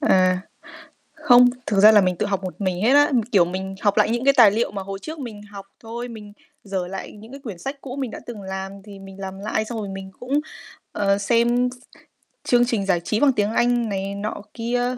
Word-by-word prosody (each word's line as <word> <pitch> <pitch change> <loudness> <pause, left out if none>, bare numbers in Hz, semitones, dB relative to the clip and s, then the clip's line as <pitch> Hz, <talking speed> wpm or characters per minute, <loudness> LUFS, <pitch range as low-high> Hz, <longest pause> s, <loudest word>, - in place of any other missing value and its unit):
À, 185 -9 +3 0.7
không, 250 -6 +6 0.2
thực 200 -2 +1
ra 215 +2 +9
là 210 - +7
mình 185 -2 0
tự - - -1
học 195 -1 -2
một 185 +2 -7
mình 185 -1 -1
hết 245 +4 +4
á. 290 0 +5 0.2
Kiểu, 190 -5 +6
mình 190 +2 -5
học 205 -1 +2
lại 210 +1 +3
những 240 +2 -1
cái 275 - +5
tài 230 -5 +8
liệu 225 +4 0
mà 200 -1 -5
hồi 195 0 -6
trước 315 +1 -7
mình 225 -7 -7
học 200 -1 -11
thôi, 235 +2 -6
mình 215 -3 -10 0.3
giở 190 -3 -3
lại 190 +2 -7
những 220 +3 -13
cái 275 - -9
quyển 220 -10 -8
sách 270 +9 -6
cũ 265 0 -7
mình 260 -4 -3
đã - - -8
từng 220 -4 -8
làm 190 0 -5
thì 205 -2 -11
mình 195 0 -12
làm 190 0 -6
lại, 215 +1 -2
xong 225 +1 -6
rồi 205 -2 -4
mình 195 0 -7
cũng, 270 +4 0 0.5
ờ, 200 -1 +1
xem 240 +3 +2
s - - -10 0.7
chương 245 -1 +3
trình 225 -5 -1
giải 180 -3 +2
trí 215 +5 -2
bằng 285 -2 +5
tiếng 210 -2 0
Anh 240 0 +1
này 195 0 -3
nọ 205 +1 -4
kia, 245 +2 -1
210 Hz, 235 wpm, -22 LUFS, 195-245 Hz, 0.7 s, ra